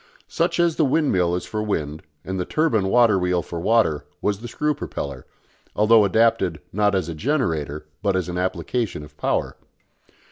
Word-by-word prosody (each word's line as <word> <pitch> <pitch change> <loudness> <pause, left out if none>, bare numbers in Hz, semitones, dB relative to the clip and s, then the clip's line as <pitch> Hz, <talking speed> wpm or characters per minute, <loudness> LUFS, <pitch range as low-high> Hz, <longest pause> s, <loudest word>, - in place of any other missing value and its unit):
Such - - 0
as 170 -2 +2
the 160 - +3
windmill 130 - +2
is 90 - -4
for 110 - -3
wind 80 -8 -2 0.2
and 95 0 -3
the - - 0
turbine 115 - +1
water 115 -2 +4
wheel 90 -1 0
for 85 - -6
water 105 -6 +2 0.2
was 100 -1 -1
the 120 - -7
screw 150 +6 0
propeller, 70 - -6 0.5
although 110 0 +5
adapted, 105 -5 +2
not 105 0 +2
as 90 -4 0
a 85 - -4
generator, 80 - -1 0.2
but 100 -2 +1
as 95 -2 -1
an 90 0 -3
application 95 +1 -2
of 75 0 -14
power. - - -1
95 Hz, 175 wpm, -23 LUFS, 85-115 Hz, 0.5 s, although